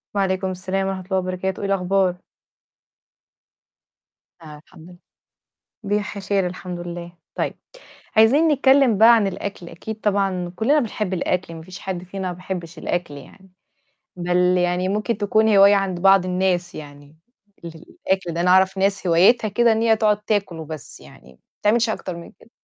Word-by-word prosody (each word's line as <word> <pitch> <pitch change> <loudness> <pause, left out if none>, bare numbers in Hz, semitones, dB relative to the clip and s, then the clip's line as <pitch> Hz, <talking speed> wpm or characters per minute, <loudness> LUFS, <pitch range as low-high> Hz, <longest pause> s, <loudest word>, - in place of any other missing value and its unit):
وعليكم 190 -1 0
السلام 190 +1 -3
ورحمة 190 -1 -4
الله 190 0 -1
وبركاته، 185 0 -3
إيه 200 - -2
الأخبار؟ 190 -1 +1 2.2
آه 155 -2 -11
الحمد 175 -1 -15
لل 175 - -15 0.9
بيح 205 0 -2
خير 195 -1 -1
الحمد 180 0 -6
لله. 175 0 -7 0.2
طيب - - -3 0.6
عايزين 260 +9 +5
نتكلم 270 -5 +4
بقى 230 +2 +8
عن 220 -3 +2
الأكل 195 -2 -6
أكيد 215 +6 -8
طبعًا 195 -4 -1
كُلّنا 270 +9 +2
بنحب 215 -5 -3
الأكل 180 -1 -2
ما 160 - -9
فيش 185 +2 -11
حد 185 -2 -5
فينا 190 +1 -5
ما 180 - -4
بيحبش 175 -2 -7
الأكل 175 -2 -3
يعني. 185 +7 -15 0.6
بل 175 0 -1 0.2
يعني 180 +1 0
ممكن 210 +2 -2
تكون 215 +1 +2
هواية 200 +1 +7
عند 195 -3 -1
بعض 195 0 +5
الناس 180 -1 -1
يعني، 145 0 -12 0.5
للأكل 170 +2 -4
ده 170 - -2
أنا 180 +1 +2
أعرف 190 +1 +4
ناس 195 0 0
هوايتها 190 +7 +4
كده 230 +3 +3
إن 220 0 0
هي 225 -1 +3
تقعد 210 -1 +1
تاكل 205 -5 -1
وبس 155 -2 -8
يعني - - -16
ما 65 - -25 0.2
بتعملش 230 +2 +2
أكتر 185 -5 -4
من 170 - -11
كده. 225 - -23
190 Hz, 160 wpm, -21 LUFS, 175-205 Hz, 2.2 s, بقى